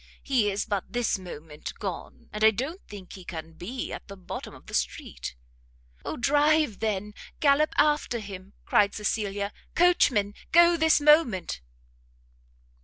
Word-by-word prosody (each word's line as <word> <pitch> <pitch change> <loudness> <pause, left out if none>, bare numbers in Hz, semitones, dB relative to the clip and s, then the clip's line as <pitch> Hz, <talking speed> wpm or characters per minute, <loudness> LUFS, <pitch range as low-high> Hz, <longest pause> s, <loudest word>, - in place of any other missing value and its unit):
He 245 -7 +2
is 200 +1 -2
but 200 -3 -3
this 240 -4 0
moment 155 -4 -8
gone, 190 -5 -6
and 210 0 -2
I 220 - +9
don't 270 - -4
think 200 -3 -10
he 190 - -10
can 165 -2 -7
be 225 +11 -5
at - - -8
the 200 - -10
bottom 185 - -7
of - - -16
the - - -12
street." - - -3 0.7
"Oh - - -4
drive 295 -2 +3
then, 210 -1 -2 0.3
gallop 295 +1 +4
after 295 -4 +2
him!" 195 -2 -9
cried 205 -1 +3
Cecilia; 205 -1 -2 0.2
"coachman! 250 - +3 0.2
go 345 +1 +7
this 320 -1 +4
moment!" 290 - +3
210 Hz, 145 wpm, -27 LUFS, 195-290 Hz, 0.7 s, I